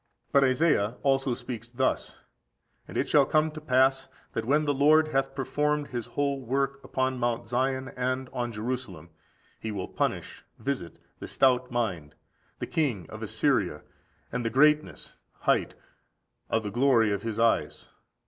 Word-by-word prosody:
16. -, -, -39 dB
But 140 Hz, -, +5 dB
Isaiah 130 Hz, -5 st, +2 dB
also 135 Hz, -2 st, +2 dB
speaks 120 Hz, -2 st, -7 dB
thus: 130 Hz, +2 st, -1 dB, 0.7 s
"And -, -, -6 dB
it -, -, +1 dB
shall 145 Hz, -2 st, +4 dB
come 155 Hz, 0 st, +2 dB
to 155 Hz, 0 st, -9 dB
pass, 130 Hz, -1 st, +2 dB, 0.3 s
that 115 Hz, -, -2 dB
when 150 Hz, +5 st, +2 dB
the 145 Hz, -, +2 dB
Lord 155 Hz, +3 st, +4 dB
hath 135 Hz, -1 st, 0 dB
performed 150 Hz, +2 st, 0 dB
His 120 Hz, -3 st, -4 dB
whole 140 Hz, -1 st, -1 dB
work 135 Hz, +2 st, -1 dB
upon 130 Hz, -1 st, -1 dB
Mount 120 Hz, -1 st, -1 dB
Zion 130 Hz, +2 st, -1 dB
and 130 Hz, +1 st, -1 dB
on 120 Hz, -1 st, -2 dB
Jerusalem, 110 Hz, -8 st, -5 dB, 0.5 s
He 110 Hz, -, -4 dB
will 95 Hz, -3 st, -4 dB
punish -, -, -3 dB
(visit) 130 Hz, -, -4 dB, 0.2 s
the -, -, -7 dB
stout 130 Hz, -1 st, +2 dB
mind, 95 Hz, -12 st, -2 dB, 0.4 s
the -, -, -4 dB
king 120 Hz, -, -1 dB
of -, -, -8 dB
Assyria, -, -, 0 dB, 0.5 s
and 125 Hz, -, -2 dB
the 115 Hz, -, 0 dB
greatness 150 Hz, +5 st, +2 dB, 0.2 s
(height) -, -, +1 dB, 0.7 s
of 110 Hz, -, +1 dB
the 105 Hz, -, -4 dB
glory 120 Hz, -3 st, +3 dB
of 100 Hz, -1 st, -1 dB
his 110 Hz, -1 st, -4 dB
eyes. 115 Hz, 0 st, +1 dB
130 Hz, 160 wpm, -28 LUFS, 115-140 Hz, 0.7 s, But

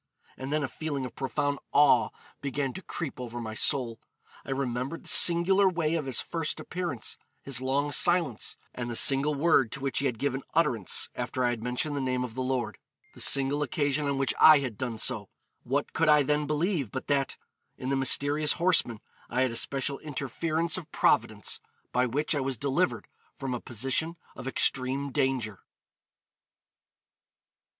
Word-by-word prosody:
And 130 Hz, +1 st, -6 dB
then 150 Hz, 0 st, 0 dB
a -, -, -1 dB
feeling 145 Hz, 0 st, -4 dB
of 125 Hz, -, -8 dB
profound 145 Hz, +1 st, -2 dB
awe 145 Hz, 0 st, +5 dB, 0.3 s
began 140 Hz, -1 st, -2 dB
to 190 Hz, -, -7 dB
creep 160 Hz, -8 st, -6 dB
over 120 Hz, -1 st, -6 dB
my 110 Hz, -2 st, -5 dB
soul. 115 Hz, 0 st, 0 dB, 0.4 s
I -, -, -12 dB
remembered 135 Hz, +2 st, -3 dB
the -, -, -12 dB
singular 190 Hz, +3 st, +6 dB
way 165 Hz, -3 st, -1 dB
of 155 Hz, -4 st, -2 dB
his 130 Hz, -, -1 dB
first 165 Hz, -2 st, -3 dB
appearance, 175 Hz, -10 st, -4 dB, 0.2 s
his 130 Hz, -3 st, -3 dB
long 140 Hz, +3 st, 0 dB
silence, 160 Hz, -5 st, +1 dB, 0.2 s
and 120 Hz, -1 st, -5 dB
the 120 Hz, -, -4 dB
single 140 Hz, +4 st, +4 dB
word 140 Hz, -6 st, +3 dB
to -, -, -4 dB
which 135 Hz, 0 st, 0 dB
he 140 Hz, -, +1 dB
had 125 Hz, -3 st, -3 dB
given 140 Hz, 0 st, -2 dB
utterance 130 Hz, -, +2 dB
after 130 Hz, -, -3 dB
I 120 Hz, -, +2 dB
had 115 Hz, -2 st, -4 dB
mentioned 125 Hz, +5 st, -2 dB
the 140 Hz, -, -2 dB
name 130 Hz, -1 st, -1 dB
of 125 Hz, -3 st, -6 dB
the 130 Hz, -, -4 dB
Lord; 125 Hz, -5 st, -2 dB, 0.3 s
the -, -, -10 dB
single 140 Hz, +2 st, +3 dB
occasion 145 Hz, 0 st, 0 dB
on 140 Hz, -1 st, -1 dB
which 135 Hz, -1 st, +1 dB
I 155 Hz, -1 st, +9 dB
had 130 Hz, -6 st, -3 dB
done 120 Hz, 0 st, -4 dB
so. 105 Hz, -2 st, 0 dB, 0.3 s
What 140 Hz, +4 st, -2 dB
could 165 Hz, -1 st, +2 dB
I 150 Hz, -1 st, +6 dB
then 150 Hz, +1 st, 0 dB
believe 155 Hz, -, 0 dB
but 130 Hz, +3 st, -5 dB
that... 140 Hz, -2 st, 0 dB, 0.4 s
in 130 Hz, -, -5 dB
the 135 Hz, -, +1 dB
mysterious 145 Hz, +3 st, +3 dB
horseman 165 Hz, -, +2 dB, 0.3 s
I 125 Hz, -, 0 dB
had 130 Hz, -2 st, +2 dB
a -, -, -5 dB
special 135 Hz, +3 st, 0 dB
interference 155 Hz, +4 st, -2 dB
of 165 Hz, -, -14 dB
Providence, -, -, +1 dB, 0.3 s
by 125 Hz, +1 st, +2 dB
which 145 Hz, +7 st, 0 dB
I 145 Hz, -, 0 dB
was 135 Hz, -2 st, -2 dB
delivered 140 Hz, +8 st, 0 dB, 0.3 s
from 135 Hz, -3 st, -4 dB
a 125 Hz, -, -4 dB
position 135 Hz, +8 st, -1 dB, 0.2 s
of 130 Hz, -, -8 dB
extreme 135 Hz, +1 st, +1 dB
danger?' 130 Hz, -7 st, -1 dB
135 Hz, 175 wpm, -28 LUFS, 125-150 Hz, 0.4 s, I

